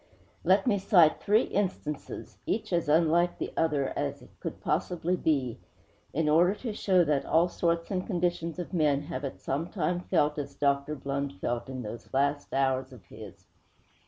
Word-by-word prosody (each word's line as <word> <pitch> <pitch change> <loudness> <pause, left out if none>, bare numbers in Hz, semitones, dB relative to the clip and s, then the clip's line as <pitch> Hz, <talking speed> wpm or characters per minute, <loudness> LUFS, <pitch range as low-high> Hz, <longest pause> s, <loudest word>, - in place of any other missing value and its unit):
Let 190 +3 +4
me 210 -5 +2
cite 180 -5 +5
three 215 +3 +4
instances 180 -7 -3
each 210 -3 -1
as 170 -3 +1
unlike 170 +3 +3
the - - -4
others 150 -4 +1
as - - -3
it - - -17
could - - -5
possibly 180 0 0
be 135 -9 0 0.5
in 160 +2 0
order 175 +6 +4
to 225 -1 -5
show 185 -3 +3
that 145 -3 +1
all 165 +2 +3
sorts 170 0 -1
and 185 -2 -1
conditions 175 -3 -1
of 180 +1 -6
men 150 -4 +2
have 145 -3 -5
at 135 - -5
some 150 +5 -2
time 175 -2 -1
felt 150 -4 +1
as 145 - -6
Dr. 140 +1 +1
Blund 140 -4 -3
felt 120 +5 -2
in 130 -1 -5
those 115 +2 -8
last 140 +1 0
hours 135 -1 0
of 115 -8 -14
his. - - -12
160 Hz, 175 wpm, -29 LUFS, 140-175 Hz, 0.5 s, cite